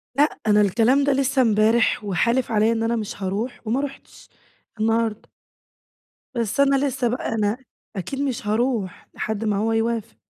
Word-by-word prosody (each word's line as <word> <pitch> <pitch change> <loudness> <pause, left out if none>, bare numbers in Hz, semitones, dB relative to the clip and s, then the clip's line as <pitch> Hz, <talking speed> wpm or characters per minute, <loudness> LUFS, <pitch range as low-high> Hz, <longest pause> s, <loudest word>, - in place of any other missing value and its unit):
لأ 290 +3 +2
أنا 210 0 +5
الكلام 230 +7 +3
ده 285 0 +2
لسه 270 0 +2
امبارح، 220 -1 +3
وحالف 235 +6 0
عليّا 220 +1 +3
إن 225 0 -1
أنا 230 +1 +1
مش 215 -3 -4
هاروح؛ 205 +7 -2
وما 235 +5 0
رُحتش 280 -1 -9 0.5
النهارده. 225 0 0 1.1
بس 230 +1 -2
أنا 275 0 +4
لسه 260 -2 -1
بقى، 240 +2 -2
أنا 215 0 0 0.4
أكيد 205 +8 -4
مش 260 -7 -3
هاروح 220 -3 -1
لحد 220 0 -3
ما 210 -2 +1
هو 220 +2 0
يوافق. 225 0 -2
225 Hz, 155 wpm, -23 LUFS, 215-260 Hz, 1.1 s, أنا